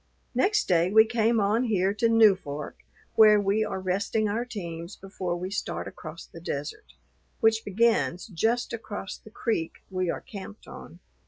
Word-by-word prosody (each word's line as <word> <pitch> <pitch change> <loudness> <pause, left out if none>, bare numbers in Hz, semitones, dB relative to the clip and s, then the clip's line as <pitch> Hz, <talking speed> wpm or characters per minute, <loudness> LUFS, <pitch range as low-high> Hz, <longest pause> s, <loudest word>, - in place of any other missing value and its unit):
Next 420 +2 +2
day 175 0 +3
we 220 +2 +7
came 225 0 +2
on 215 +5 +2
here 195 -4 +1
to 215 +3 +1
Newfork, 190 -10 +3 0.4
where 215 -1 +7
we 205 +2 +1
are 190 - -3
resting 200 +4 0
our 225 +4 -1
teams 170 -6 -7
before 190 -2 -4
we 185 +2 -5
start 90 - -3
across 155 +11 -9
the 165 - -13
desert, 145 -2 -5 0.5
which 225 -1 +3
begins 205 -3 +1
just 230 +5 -1
across 205 -4 -6
the - - -15
creek 215 -7 -2 0.2
we 185 -1 -1
are - - -2
camped 205 0 -10
on. - - -11
205 Hz, 160 wpm, -27 LUFS, 180-225 Hz, 0.5 s, we